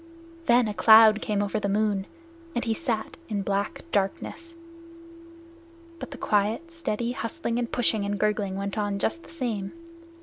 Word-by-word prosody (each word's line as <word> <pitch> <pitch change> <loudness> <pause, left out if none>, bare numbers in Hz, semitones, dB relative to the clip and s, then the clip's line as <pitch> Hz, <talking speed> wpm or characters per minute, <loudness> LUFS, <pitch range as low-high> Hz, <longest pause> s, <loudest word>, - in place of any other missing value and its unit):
Then 240 -1 +5
a 210 - -2
cloud 220 +2 +7
came 205 -1 0
over 205 +1 -1
the 200 - -2
moon, 205 -1 0 0.5
and 240 - -1
he 225 - +1
sat 230 -5 -3
in 205 -2 -1
black 200 +1 -2
darkness. 270 - -2 1.4
But - - -7
the 275 - -9
quiet, 215 +12 0
steady 240 -8 -2
hustling 235 0 -3
and 240 -1 -3
pushing 225 -4 +2
and 200 0 -2
gurgling 210 -2 0
went 200 +2 -3
on 205 -1 -1
just 275 +11 -1
the - - -16
same. 230 -11 -3
215 Hz, 160 wpm, -26 LUFS, 200-240 Hz, 1.4 s, cloud